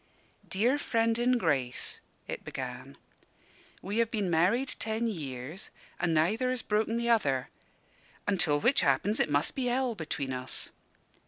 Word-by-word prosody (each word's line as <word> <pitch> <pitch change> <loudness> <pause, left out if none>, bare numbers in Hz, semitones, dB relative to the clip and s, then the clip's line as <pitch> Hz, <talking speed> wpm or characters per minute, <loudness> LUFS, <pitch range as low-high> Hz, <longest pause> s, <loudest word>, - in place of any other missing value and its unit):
"Dear 240 +9 +2
Friend 230 -3 +1
in 250 +1 +3
Grace," 140 - -1 0.3
it - - -5
began, 130 +1 -6 0.9
"we 205 +4 -1
have 230 -1 +3
been 205 -6 -1
married 195 +11 +2
ten 220 +1 -1
years, 150 - -5 0.3
and 175 -1 +1
neither 195 +11 +2
has 255 -2 -1
broken 220 +2 +1
the 235 0 -1
other; 135 - +2 0.8
until 170 -7 +3
which 245 - +4
happens, 210 +2 +2
it - - +2
must 145 0 +1
be 265 - -2
hell 250 0 +1
between 150 -7 -3
us. 130 0 -2
200 Hz, 145 wpm, -30 LUFS, 145-230 Hz, 0.9 s, which